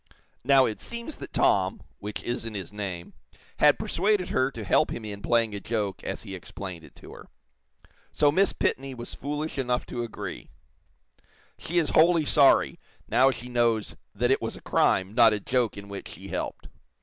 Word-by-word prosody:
Now, 135 0 +6
it 105 -3 -4
seems 235 +6 -6
that - - -9
'Tom' 95 -1 +2 0.2
which 105 +1 -6
isn't 115 -2 -3
his 95 0 -6
name, 95 -5 -5 0.4
had - - +5
persuaded 200 +1 0
her 130 +1 +2
to 115 -5 -7
help - - +3
him 115 - -5
in 100 -1 -6
playing 115 -1 +2
a 100 - -4
joke, 105 -2 -3
as - - -4
he 100 -3 -8
explained 90 -1 -8
it - - -16
to - - -13
her. - - -12 0.8
So 145 -1 +3
Miss 195 +6 +3
Pitney 135 0 -2
was 120 0 -8
foolish 150 +1 -4
enough 125 -1 0
to 120 - -4
agree. 120 -2 -6 1.1
She 175 - -3
is 160 -4 +2
wholly 165 -1 +5
sorry, 140 -1 +4 0.3
now 130 +1 +5
she 125 -1 -5
knows 120 -3 +1 0.2
that 120 +5 +1
it - - +2
was - - -3
a - - -12
crime, 95 +2 +2
not 115 -2 +6
a 105 - -1
joke 120 0 0
in 100 0 -8
which 100 -1 -7
she - - -10
helped. - - -4
120 Hz, 185 wpm, -27 LUFS, 100-135 Hz, 1.1 s, Now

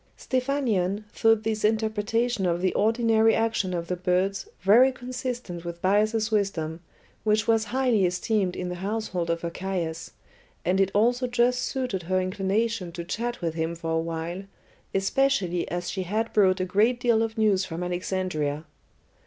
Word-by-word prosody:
Stephanion 245 -7 0
thought 225 -1 +3
this 220 -1 -2
interpretation 220 0 +1
of 170 0 0
the 185 +1 +1
ordinary 225 0 +3
action 225 -4 0
of 170 -2 -2
the 180 - -1
birds 185 +2 0
very 230 +8 +6
consistent 245 -7 -5
with 170 0 -6
Bias's 215 +4 +2
wisdom, 175 -6 -1 0.4
which 215 0 +2
was 225 -1 +3
highly 245 -7 +2
esteemed 185 +1 0
in 180 - -4
the 180 - -5
household 195 -4 -2
of 170 0 -1
Archias, 170 -1 -4 0.5
and 190 +2 +2
it 195 - +3
also 245 +4 +3
just 250 0 +2
suited 250 -8 -2
her 185 +2 0
inclination 195 +1 -1
to 170 -1 -5
chat 235 +7 -3
with 165 -2 -1
him 165 +1 -2
for 165 -1 -4
a 160 - +2
while, 165 +2 -4 0.5
especially 195 -4 +1
as 175 0 -3
she 190 +1 -3
had 215 +5 -2
brought 190 -3 +4
a 185 - 0
great 215 +6 +2
deal 235 -2 +3
of 225 0 -2
news 205 -3 +3
from 175 -1 -5
Alexandria. 175 -4 -2
195 Hz, 160 wpm, -26 LUFS, 180-225 Hz, 0.5 s, very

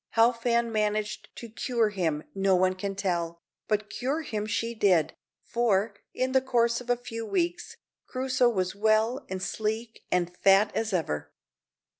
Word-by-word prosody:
How 230 +2 +7
Fan 235 0 0
managed 215 0 -1
to 235 - -8
cure 230 0 0
him 165 -7 -1
no 195 -1 +3
one 185 +1 +3
can 195 +1 -4
tell, 170 -4 -2 0.3
but 210 0 0
cure 280 +9 -2
him 215 -6 -3
she 230 +2 -1
did, 190 -8 +3 0.3
for, 220 -3 +1 0.2
in 255 0 -1
the 265 0 +4
course 235 -2 +1
of 245 - -12
a 245 - +3
few 230 -1 -6
weeks, 350 - -2 0.3
Crusoe 255 -1 +2
was 185 -5 0
as - - -9
well 220 +5 +2
and 185 0 -4
sleek 220 +4 -3
and 180 0 0
fat 195 +2 +5
as 225 -1 -1
ever. 160 - -2
215 Hz, 165 wpm, -28 LUFS, 195-235 Hz, 0.3 s, How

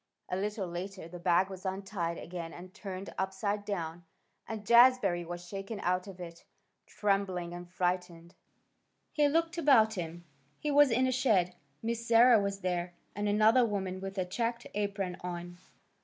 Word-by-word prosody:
A - - -1
little 205 0 -2
later 180 +1 -6
the 175 +1 -9
bag 175 +1 +3
was 185 -1 -8
untied 190 -3 -3
again 170 -1 -6
and 180 +1 -11
turned 195 -2 -7
upside 195 +2 -1
down, 175 -4 -4 0.4
and 220 -2 -6
Jazbury 235 -6 +5
was 175 +1 -7
shaken 195 +3 -6
out 180 +2 0
of 190 -2 -10
it. 170 -1 -9 0.4
Trembling 195 -4 -1
and 175 0 -8
frightened, 175 -1 -2 0.8
he 295 -1 +3
looked 330 +3 +1
about 235 -8 +5
him. 175 -2 -6 0.3
He 300 - -2
was 290 -1 +6
in 250 +2 +3
a 260 - +2
shed. 200 -9 +2 0.3
Miss 230 +1 -2
Sarah 235 -1 +7
was 200 0 -3
there, 175 -1 -2 0.2
and 205 +1 -1
another 215 +4 +5
woman 190 -4 -2
with 195 +1 -6
a 185 - 0
checked 235 +5 -2
apron 200 -3 -2
on. 175 0 -6
195 Hz, 160 wpm, -31 LUFS, 175-220 Hz, 0.8 s, Sarah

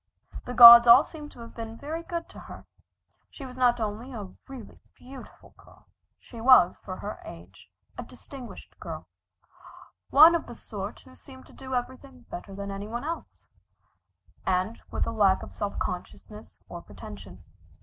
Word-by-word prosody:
The 245 - -7
gods 235 0 +11
all 240 +5 +8
seemed 300 -2 -11
to 240 - -14
have 230 - -12
been 225 0 -8
very 310 +5 -6
good 335 0 -6
to - - -13
her. - - -12 0.6
She 275 - -11
was 250 -1 -11
not 245 -1 +2
only 220 +4 -5
a 210 -6 -9
really 260 -6 -12 0.2
beautiful 265 0 -15
girl, - - -21 0.3
she 230 -2 -13
was, 245 -8 +5
for 185 - -9
her 205 - -7
age, - - -14 0.3
a - - -5
distinguished 260 -4 -13
girl, - - -8 1.0
one 315 +4 +7
of 340 - -2
the 240 - -10
sort 205 -2 -8
who 260 - -18
seemed 260 -1 -16
to - - -18
do 260 -1 -7
everything 255 +1 -6
better 195 +2 -9
than 200 0 -6
any 200 +1 -7
one 235 +3 -6
else, 330 +2 -7 1.0
and 185 +4 -2
with - - -2
a - - -4
lack 200 -4 +2
of - - -11
self 205 -1 -5
consciousness 210 +4 -8
or - - -9
pretension. - - -13
240 Hz, 170 wpm, -26 LUFS, 210-265 Hz, 1.0 s, gods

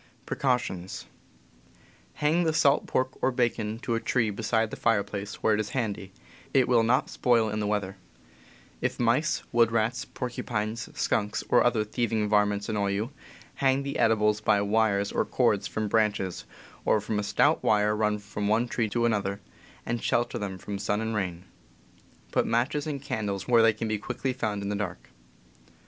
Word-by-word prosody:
Hang 160 +4 +2
the 160 -1 +1
salt 140 -2 +3
pork 130 0 0
or - - +3
bacon 120 -4 -1
to 120 - -1
a 115 - +1
tree 115 -2 +1
beside 110 +1 0
the - - -4
fire 115 -3 +2
place, 100 0 -7
where 110 - +4
it 105 - +1
is 105 -1 -2
handy; 105 -5 -3 0.4
it 130 -2 +5
will 120 -2 +4
not 120 +3 +2
spoil 115 -3 +2
in 105 +1 -2
the 105 - -1
weather. 105 -2 -1
p. 100 - -17 0.9
If - - -10
mice, 125 +7 +1
wood 115 -1 +4
rats, 115 +1 0
porcupines, 115 -2 -4
skunks, 105 -1 0
or - - +5
other 120 -3 +2
thieving 110 -1 -1
varmints 105 -1 +2
annoy 100 -2 0
you, 105 +6 -2 0.5
hang 135 0 +2
the 140 - -4
edibles 105 -2 +3
by 105 - +3
wires 100 -1 +1
or - - +1
cords - - +1
from 110 0 -2
branches, 105 -4 0 0.4
or - - +3
from 105 0 -2
a - - -1
stout 100 - +2
wire 105 0 +3
run 105 0 +1
from 105 0 -4
one 110 +3 +2
tree 115 -2 -1
to 120 +3 0
another, 100 -3 0 0.5
and 120 0 -2
shelter 120 0 0
them 100 -3 -4
from 100 +2 -6
sun 105 +1 0
and 110 0 -2
rain. 90 -4 -3 0.9
Put - - +1
matches 135 +6 0
and 145 -2 -3
candles 105 -8 -3
where 120 -2 +5
they 115 0 +6
can 115 +1 -4
quickly 130 +5 -3
be - - -22
found 105 -3 -1
in 100 - -3
the 105 - -1
dark. 85 -12 -5
110 Hz, 180 wpm, -27 LUFS, 105-120 Hz, 0.9 s, they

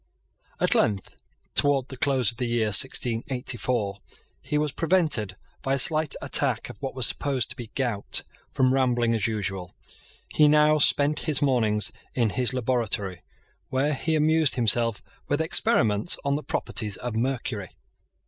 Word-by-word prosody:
At - - +2
length, 100 -3 0 0.4
towards 140 -2 +1
the 130 - -7
close 130 -5 +1
of 115 - -15
the 125 - -1
year 115 -2 0
1684, 120 -2 0 0.4
he 150 +3 -2
was 150 -1 0
prevented, 155 - 0 0.3
by 135 0 0
a - - -1
slight 155 +2 +3
attack - - 0
of - - -18
what 135 -2 -5
was 130 -3 +1
supposed 135 -3 -1
to - - -6
be 120 - -7
gout, 120 -7 -1 0.3
from 130 0 +2
rambling 120 -3 +1
as 110 -1 0
usual. 95 -4 -4 0.5
He 150 - +3
now 150 +1 +4
spent 145 +1 +3
his 150 - +3
mornings 110 -7 +1 0.2
in 115 -4 +1
his 125 +1 0
laboratory, 115 -7 -1 0.5
where 140 +3 0
he 160 +3 -1
amused 155 -1 +3
himself 115 -2 +1 0.2
with 145 - 0
experiments 110 -9 +2
on 140 - +1
the 150 - -3
properties 110 -6 -2
of 120 -2 -5
mercury. 115 -4 -2
125 Hz, 150 wpm, -25 LUFS, 110-145 Hz, 0.5 s, now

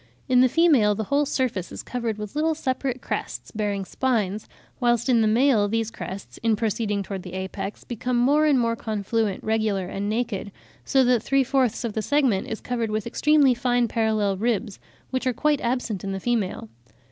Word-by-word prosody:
In 250 -1 +5
the 255 - +5
female 270 -10 +4
the 220 - -2
whole 280 +6 +1
surface 245 -10 -1
is - - -7
covered 235 -3 -3
with 210 +2 -7
little 315 +1 +1
separate 260 -3 -2
crests, - - -4
bearing 205 -3 -2
spines; 215 -4 -1 0.3
whilst 240 -1 +2
in 235 -3 +4
the 220 - +3
male 225 -1 +3
these 225 +1 -1
crests 195 -3 -8
in 225 -1 +2
proceeding 210 -1 -1
towards 195 -1 -6
the 180 - -9
apex, 190 +2 -5
become 245 +1 -2
more 290 +5 +4
and 290 -3 +4
more 230 -1 +1
confluent, 215 -2 -2
regular, 215 -4 0
and 200 +1 -3
naked; 215 -3 -2 0.3
so 270 -2 +3
that 245 -2 +3
three 275 +3 +2
fourths 260 -3 +1
of 230 -3 -3
the 220 - -1
segment 260 -7 +1
is 220 - -5
covered 235 -3 -2
with 215 0 -2
extremely 290 +2 +4
fine 245 0 +1
parallel 215 -3 0
ribs, 215 -1 -1 0.3
which 260 0 -1
are 255 - +2
quite 300 +3 +1
absent 235 -5 -2
in 195 0 -3
the 195 - -3
female. 210 - -1
230 Hz, 190 wpm, -24 LUFS, 210-255 Hz, 0.3 s, In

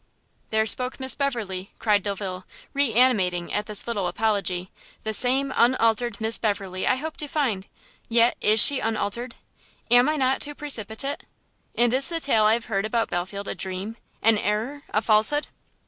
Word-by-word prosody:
"There 220 0 +1
spoke 250 +5 0
Miss 260 0 +1
Beverley!" 215 -9 -4
cried 210 -2 +1
Delvile, 190 -2 -5 0.3
reanimating 225 -10 +2
at 210 0 -2
this 210 -1 +1
little 205 -6 -2
apology, 190 -2 -1 0.3
"the 220 - -3
same, 260 +5 +3
the 260 - +2
unaltered 235 -3 +1
Miss 220 +1 +2
Beverley 195 -4 -2
I - - +3
hoped 315 +4 -7
to 295 - -2
find! 245 -11 -2 0.4
yet 235 +1 +3
is 215 +1 +4
she 275 +5 +7
unaltered? 225 +2 -3 0.6
am 245 +3 +6
I 310 - 0
not 265 -2 0
too 295 0 -6
precipitate? 275 -1 -2 0.5
and 240 0 +2
is 270 +3 +5
the 335 -1 -2
tale 225 -8 +2
I 215 - +5
have 230 0 -1
heard 200 -1 -2
about 230 0 -1
Belfield 190 +3 -4
a - - -2
dream? 190 +4 -5 0.3
an 220 -1 +4
error? 225 +9 -2
a 215 - -1
falsehood?" 220 +7 +2
225 Hz, 170 wpm, -24 LUFS, 205-255 Hz, 0.6 s, she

